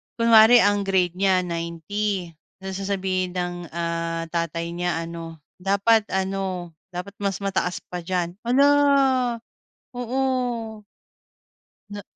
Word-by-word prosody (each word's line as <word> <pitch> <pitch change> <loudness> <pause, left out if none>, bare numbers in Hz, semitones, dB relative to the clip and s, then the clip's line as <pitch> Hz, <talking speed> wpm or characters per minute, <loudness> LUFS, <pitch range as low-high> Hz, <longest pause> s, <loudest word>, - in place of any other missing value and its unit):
kunwari 230 0 +7
ang 205 0 +2
grade 185 -3 +2
niya 190 -1 +3
90 170 +2 -3 0.3
tapos 190 0 -6
sasabihin 190 -2 -1
ng, 175 0 -2 0.2
ah, 165 0 -2
tatay 170 0 -2
niya 175 -1 -1
ano, 165 -1 -8 0.2
dapat 200 +4 +3
ano, 190 -2 -2 0.2
dapat 180 +3 -7
mas 200 -1 -2
mataas 190 -2 -1
pa 180 - -5
diyan. 175 -1 -2
Hala, 265 +4 +4 1.3
oo. 245 -3 -2 1.1
Na 205 0 -7
190 Hz, 110 wpm, -24 LUFS, 170-205 Hz, 1.3 s, kunwari